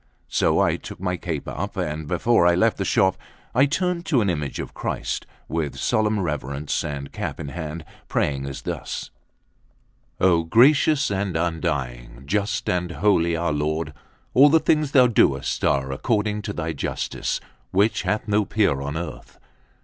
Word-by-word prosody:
So - - +2
I - - +2
took - - -10
my 90 0 -1
cape 85 -4 -4
up, - - -4
and 75 0 -3
before 90 +2 +3
I 85 - +4
left 110 +5 +2
the 95 - -1
shop, 95 0 +3 0.4
I 135 +4 +5
turned 180 +3 -1
to 140 - +3
an 100 -3 +2
image 75 -4 -3
of - - -5
Christ, - - -3 0.2
with 80 -3 -2
solemn 110 -1 +1
reverence 75 -4 -2
and 70 -1 -5
cap - - -4
in 70 - -5
hand, 80 +1 -6 0.2
praying 70 -1 -1
as 70 - -6
thus: - - -5 1.1
"O 90 -3 +4
gracious 140 - +4
and 95 -3 -1
undying, 65 -7 -3
just 100 +6 -1
and 90 -1 -1
holy 85 0 +2
our 85 -1 0
Lord, 75 +1 -1 0.4
all 140 +3 +7
the 160 +2 +5
things 155 -2 +2
thou 130 -2 +7
doest 70 - +2
are 65 -1 +1
according 105 - 0
to 105 - -4
thy 80 -2 -3
justice, 70 - -3 0.3
which 100 +4 +2
hath 110 +2 -1
no 105 0 +3
peer 100 -10 +1
on 70 +2 -3
earth. 85 0 -7
85 Hz, 165 wpm, -23 LUFS, 75-105 Hz, 1.1 s, all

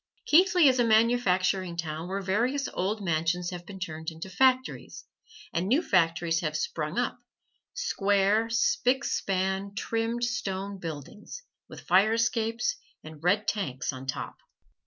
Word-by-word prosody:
Keighley 355 0 +5
is 255 -1 +3
a - - +5
manufacturing 195 -6 +2
town 160 0 -4
where 195 +1 -3
various 245 +9 0
old 200 +3 -2
mansions 170 +2 0
have 175 -1 -8
been 195 -2 -9
turned 160 -3 -5
into 165 +3 -9
factories, 260 +5 +1 0.5
and 175 +3 -1
new 275 - +3
factories 165 - +2
have 155 -2 -2
sprung 155 +3 -3
up, 245 0 -1 0.6
square, 205 - +1
spick 250 +3 +2
span, 190 -1 -1
trimmed 230 +3 -2
stone 200 -5 -3
buildings, 165 - -8 0.3
with - - -10
fire 195 +5 +4
escapes 230 - 0 0.3
and 155 0 -12
red 200 +4 +2
tanks 140 -11 -2
on 130 0 -9
top. 130 - -4
195 Hz, 135 wpm, -28 LUFS, 170-230 Hz, 0.6 s, Keighley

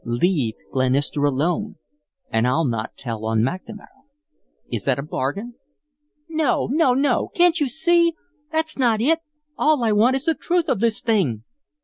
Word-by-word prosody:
Leave 120 - 0 0.2
Glenister 135 +2 +1
alone 170 +10 0 0.6
and 115 +2 +2
I'll 155 +6 +1
not 115 -4 -3
tell 115 -4 -6
on 110 0 +1
McNamara. 185 - -4 0.9
Is - - -3
it - - +2
a 140 - -3
bargain?" 155 - -3 0.7
"No, 315 -4 0
no, 280 -4 +3
no! 280 +2 +1
Can't 350 -2 +4
you 290 -3 0
SEE? 335 +4 +2 0.4
That's 315 -2 -2
not 235 -4 +3
it. 320 +8 +2 0.4
All 300 -4 +3
I 225 - +2
want 225 +5 +4
is 270 +2 -2
the 325 - +3
truth 345 0 -1
of 200 - +1
this 230 0 +1
thing." 170 - 0
215 Hz, 155 wpm, -22 LUFS, -, 0.9 s, Can't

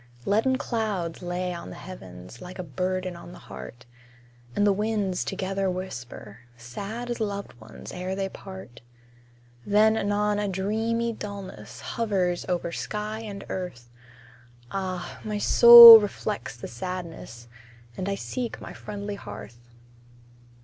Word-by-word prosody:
Leaden 225 +6 +2
clouds 215 - -3
lay 180 0 -3
on 170 - -8
the - - -9
heavens, 95 - -11
Like 180 +1 -9
a 185 - -4
burden 185 +4 -3
on 170 - -11
the - - -11
heart; 65 - -11 0.7
And 205 - +2
the 205 - +4
winds 205 -3 -1
together 195 0 -2
whisper, 125 - -7 0.2
Sad 200 - -6
as 240 - -4
loved 200 -2 -4
ones 110 0 -11
ere 185 +1 -4
they 195 0 -2
part. 190 -11 -11 0.8
Then 215 +2 +4
anon 205 0 0
a 205 - -1
dreamy 220 +5 -1
dullness 200 - -8
Hovers 190 -6 -1
over 175 -1 -1
sky 210 +4 -4
and 205 -3 -7
earth; 125 -11 -6 0.8
Ah! 185 -2 -4
my 210 -1 -3
soul 235 +1 +11
reflects 205 - -4
the - - -7
sadness, 165 -5 -7 0.5
And 185 +7 -3
I 195 - -1
seek 240 +3 -5
my - - -9
friendly 205 0 -6
hearth. 110 - -10
195 Hz, 135 wpm, -26 LUFS, 175-210 Hz, 0.8 s, soul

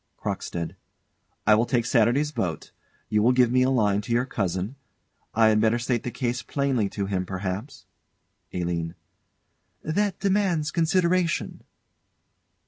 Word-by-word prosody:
CROCKSTEAD. 85 +1 -4 0.7
I 105 - +6
will 115 +3 +3
take 120 -2 +1
Saturday's 125 +5 +2
boat 90 - -3 0.4
you 105 - +2
will 120 +4 +4
give 125 -2 +4
me 130 0 +3
a 130 - +3
line 105 -6 +2
to 120 +3 -7
your 120 +2 +2
cousin. 95 -1 -2 0.6
I 110 -1 +5
had 105 0 +3
better 110 +1 +3
state 120 -1 -1
the - - -4
case 120 -1 -2
plainly 135 -7 0
to 100 0 -3
him, 95 -2 -1
perhaps? 95 +8 -5 0.7
ALINE. 85 -1 -2 0.9
That 195 +4 0
demands 190 -6 +1
consideration. 175 0 +1
120 Hz, 135 wpm, -25 LUFS, 100-140 Hz, 0.9 s, I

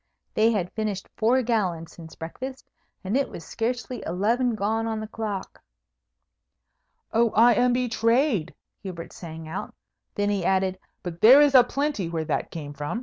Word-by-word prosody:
They 220 +1 +4
had 185 -5 -2
finished 215 -3 -3
four 245 +4 +3
gallons 185 -9 -1
since 160 -1 -12
breakfast, 260 +12 -8 0.3
and 195 +5 -2
it 275 0 +1
was 165 - -9
scarcely 245 +1 -3
eleven 230 +7 +1
gone 220 +2 -1
on 220 -1 -2
the 215 - -4
clock! 210 -3 -5 1.5
"Oh, 230 +1 +4
I 235 +2 +7
am 245 +3 +3
betrayed!" 235 - +1 0.3
Hubert 180 -4 -7
sang 160 -2 -8
out. 165 +4 -6 0.4
Then 205 -1 +1
he 200 -3 -1
added, 190 0 +1 0.2
"But 170 -1 -6
there 255 +6 +9
is 290 -1 +5
a 255 -2 +9
plenty 275 - -2
where 165 -2 -2
that 155 - -2
came 145 -3 -7
from." 150 +10 -4
215 Hz, 160 wpm, -25 LUFS, 180-240 Hz, 1.5 s, there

